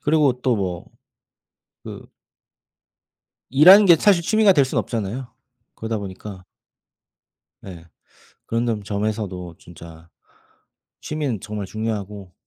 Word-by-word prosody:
그리고 150 -3 +2
또 125 -1 +1
뭐 90 -3 -4 1.0
그 - - -9 1.5
일하는 185 - +7
게 170 -2 +7
사실 190 -1 +3
취미가 215 +2 +4
될 145 -6 +3
수는 130 - -3
없잖아요. 115 +3 -5 0.5
그러다 110 -1 -4
보니까 95 -1 -9 1.2
예. 85 -3 -10 0.6
그런 115 +1 -1
점 110 -3 -2
점에서도 100 -4 -4
진짜 85 -1 -14 0.9
취미는 145 -9 -4
정말 105 -1 -6
중요하고 105 -3 -6
110 Hz, 225 characters per minute, -21 LUFS, 95-140 Hz, 1.5 s, 일하는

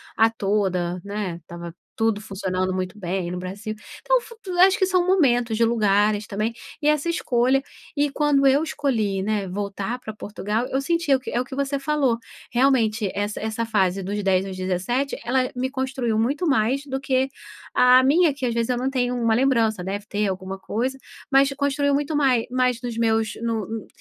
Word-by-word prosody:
a 225 0 +5
toda, 190 -5 -1
né, 200 -4 -4
estava 170 +1 -9 0.2
tudo 225 -2 +1
funcionando 185 -2 -2
muito 185 +2 -3
bem 180 -2 -3
no 180 - -4
Brasil. 200 +4 -5 0.3
Então, - - +3
fu 465 - -13 0.3
acho 385 +1 +6
que 380 - +4
são 365 -2 +2
momentos 245 - +3
de 235 - +3
lugares 210 -2 +2
também, 215 +3 -2 0.3
e 295 - 0
essa 300 +2 +2
escolha 265 -5 +2 0.4
e 290 0 +2
quando 280 -2 +3
eu 280 +4 +4
escolhi, 230 -11 -1
né, 205 -1 -1
voltar 200 +5 -4
pra 220 -3 -7
Portugal, 210 +3 -3
eu 270 +1 -1
senti 335 0 0
é - - +7
o - - -1
que 260 - -7
é 240 - 0
o - - -2
que 265 - -10
você 280 0 -1
falou, 275 -5 +1 0.3
realmente, 235 -5 +2
essa 205 +1 -2
essa 220 +1 -2
fase 195 -3 +1
dos 200 +2 -3
10 190 0 +2
aos 190 - -6
17, 185 +9 -1
ela 255 +1 +1
me 260 +1 -1
construiu 260 -4 -2
muito 280 +10 0
mais, 270 +2 +1
do 265 0 -2
que 265 0 +1 0.5
a 250 +1 +7
minha, 305 +2 +4
que 270 -2 -4
às 235 - -1
vezes 235 +1 -1
eu 245 - +1
não 260 +2 0
tenho 250 -2 0
uma 230 -2 +2
lembrança, 230 -7 +2
deve 200 +2 -4
ter 210 -1 0
alguma 190 0 -4
coisa, 250 +7 -2 0.3
mas 275 +1 +5
construiu 285 0 +1
muito 290 +2 0
mai 260 -5 +3
mais 250 -1 +1
nos 240 -2 -5
meus, 225 -2 +1
no 225 -4 -1
uh, 225 -1 -6
230 Hz, 195 wpm, -23 LUFS, 205-270 Hz, 0.5 s, é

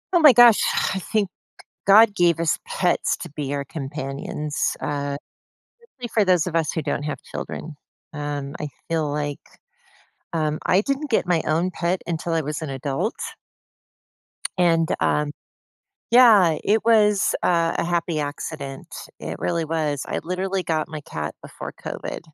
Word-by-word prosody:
Oh - - +6
my 305 -3 +9
gosh, 240 -2 +7 0.3
I 190 - -2
think 205 +3 0 0.6
God 210 +1 +7
gave 175 -4 +3
us 165 -1 +1
pets 180 -2 +1
to 175 - -7
be 145 -1 -4
our 140 0 -2
companions, 145 +1 -3
uh, 140 0 -2 0.7
especially 270 - -9
for 215 - +4
those 180 -4 +3
of 170 -2 -4
us 160 -3 +1
who 160 - -3
don't 145 - -1
have 150 -1 -3
children, 155 -1 -6 0.4
um, 145 -2 -4
I 150 - -3 0.2
feel 160 -3 0
like, 145 -1 -2 0.9
um 155 -2 -1
I 185 - +4
didn't 275 +5 -2
get 220 - +1
my 170 -3 +2
own 170 +4 +1
pet 175 +1 -1
until 170 0 -2
I 165 - +2
was 150 +2 -4
an 155 - -4
adult 135 - -2 1.4
and, 165 -2 +3
um 150 0 +1 0.8
Yeah, 215 -10 +7
it 215 +1 +2
was, 210 -3 +4
uh, 170 -1 +2
a - - +1
happy 170 -2 0
accident, 145 -1 -5 0.3
it - - -6
really 170 -1 -1
was. 155 -3 -1
I - - -2
literally 185 +2 -2
got 160 -3 -1
my 155 -1 -6
cat 75 - -5
before - - -8
COVID, - - -5
165 Hz, 155 wpm, -23 LUFS, 150-185 Hz, 1.4 s, my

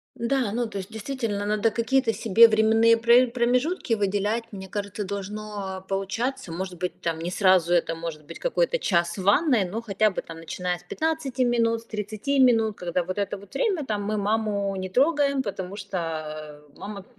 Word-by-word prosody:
Да, 240 -2 0
ну, 235 +2 -1
то 220 - -7
есть, 190 +3 -8
действительно, 220 -2 -3
надо 215 +1 +1
какие-то 230 +2 +1
себе 225 +2 +6
временные 225 +1 +4
пр 235 +1 +5
промежутки 250 +3 +1
выделять. 205 +2 0
Мне 190 -2 -8
кажется, 205 +1 -4
должно 200 -1 -5
получаться. 195 +3 -2
Может 180 +1 -5
быть, 180 +1 -4
там, 165 -1 -2
не 170 +2 -3
сразу 185 -3 +3
это, 165 -1 +2
может 165 -2 -6
быть, - - -10
какой-то - - +1
час 170 - +1
в 190 - -4
ванной, 235 - +4
но 210 +6 -4
хотя 215 -1 +2
бы, 190 - -4
там, 165 0 -10
начиная 180 +2 -3
с 175 - -19
15 275 - -1
минут, 230 -1 +1
с - - -20
30 215 +6 -2
минут, 225 -5 +4
когда 180 0 -1
вот 185 +3 -5
это 200 -1 -2
вот 200 0 -15
время, 385 - 0
там, 210 -4 -2
"мы 215 +1 -1
маму 205 -1 0
не 185 0 -4
трогаем, 280 - +2
потому 195 -4 -5
что 155 -6 -5
мама, 200 -1 -8
210 Hz, 180 wpm, -25 LUFS, 185-235 Hz, -, себе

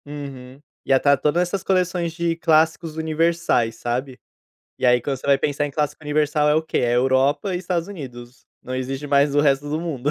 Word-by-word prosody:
Uhum. 140 -3 -9 0.3
Ia 135 - +4
estar 140 +1 +4
todas 155 +6 +1
essas 180 +1 -3
coleções 180 -3 0
de 170 -1 -1
clássicos 160 0 +1
universais, 160 -7 0
sabe, 125 +3 -4 0.6
e - - -4
aí 125 0 +5
quando 135 +3 -3
você 130 - -10
vai 140 -1 +4
pensar 145 0 -1
em - - -6
clássico 150 +2 -2
universal 150 0 +1
é 150 - +4
o 160 - +2
que, 160 - -4
é 120 0 +1
Europa 135 +9 +2
e - - -1
Estados 175 -1 -2
Unidos, 125 -9 -10 0.2
não 130 - -6
existe 135 +2 -4
mais 140 0 +3
o 145 - +4
resto 145 0 +1
do 155 +2 -1
mundo. 145 -5 -2
145 Hz, 200 wpm, -22 LUFS, 135-165 Hz, 0.6 s, aí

